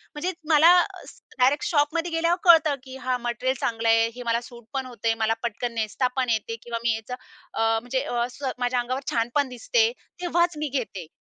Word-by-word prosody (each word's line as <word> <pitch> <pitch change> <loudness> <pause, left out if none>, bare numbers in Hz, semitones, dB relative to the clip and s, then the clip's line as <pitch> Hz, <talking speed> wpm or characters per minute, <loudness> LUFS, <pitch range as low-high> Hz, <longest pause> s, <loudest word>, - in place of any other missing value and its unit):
म्हणजे 350 +5 -2 0.2
मला 315 +2 +7
अ, - - -6 0.4
डायरेक्ट 275 +10 +3
शॉपमध्ये 330 +1 +1
गेल्यावर 335 +2 +1
कळतं 320 -5 +6
की 260 -1 -9
हा 255 -1 -1
मटेरियल 245 +2 -2
चांगलं 225 -1 0
आहे, 225 0 +5
हे 245 - -7
मला 235 0 0
सूट 235 -1 -13
पण 265 -1 -2
होते, 230 -2 -1
मला 225 - +3
पटकन 235 +1 -3
नेसता 225 +3 0
पण 255 -2 +1
येते 225 0 -1
किंवा 235 -1 -4
मी 235 -2 +2
याचं 225 +3 -7 0.4
अ, - - -2 0.2
म्हणजे 260 +2 -2
अ, 240 -4 -1
स, 285 - -13 0.2
माझ्या 245 0 +1
अंगावर 255 +3 -2
छान 230 0 0
पण 285 -2 +2
दिसते. 455 - +1 0.3
तेव्हाच 345 -2 +1
मी 300 -1 -2
घेते. 200 - -3
250 Hz, 200 wpm, -25 LUFS, 235-300 Hz, 0.4 s, मला